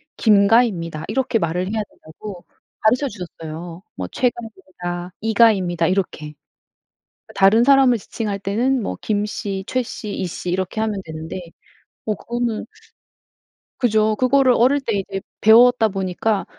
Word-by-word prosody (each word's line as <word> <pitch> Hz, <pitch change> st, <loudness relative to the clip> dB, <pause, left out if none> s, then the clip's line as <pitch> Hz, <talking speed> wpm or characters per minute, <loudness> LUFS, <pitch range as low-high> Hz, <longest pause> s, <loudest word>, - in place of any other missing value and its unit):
"김 205 Hz, -3 st, +4 dB
가입니다." 185 Hz, -9 st, +1 dB
이렇게 260 Hz, -3 st, 0 dB
말을 170 Hz, 0 st, -1 dB
해야 215 Hz, +4 st, -2 dB
된다고 175 Hz, +3 st, -11 dB, 0.4 s
가르쳐 250 Hz, +6 st, +2 dB
주셨어요. 170 Hz, -, -8 dB
뭐 90 Hz, -, -5 dB
"최 250 Hz, -, +2 dB
가입니다." 185 Hz, -6 st, -8 dB
"이 220 Hz, +1 st, -1 dB
가입니다." 185 Hz, -7 st, +3 dB
이렇게. 170 Hz, -5 st, -2 dB, 0.9 s
그러니까 -, -, -15 dB
다른 200 Hz, +4 st, +6 dB
사람을 265 Hz, -3 st, +5 dB
지칭할 205 Hz, 0 st, -4 dB
때는 235 Hz, +7 st, 0 dB
뭐 -, -, -4 dB
김 210 Hz, -1 st, 0 dB
씨, 205 Hz, -2 st, -4 dB
최 255 Hz, -, -1 dB
씨, 220 Hz, -3 st, -7 dB
이 190 Hz, -, -3 dB
씨 180 Hz, 0 st, -5 dB
이렇게 185 Hz, +4 st, -2 dB
하면 215 Hz, -3 st, -2 dB
되는데 160 Hz, +2 st, -7 dB, 0.7 s
어 215 Hz, -, 0 dB
그거는 235 Hz, +1 st, -3 dB, 1.2 s
그죠. 215 Hz, -3 st, +2 dB
그거를 255 Hz, +1 st, +4 dB
어릴 270 Hz, +4 st, +3 dB
때 235 Hz, -4 st, -2 dB
이제 195 Hz, 0 st, -5 dB, 0.2 s
배웠다 230 Hz, +1 st, +6 dB
보니까 195 Hz, +1 st, -1 dB
210 Hz, 305 characters per minute, -20 LUFS, 180-235 Hz, 1.2 s, 다른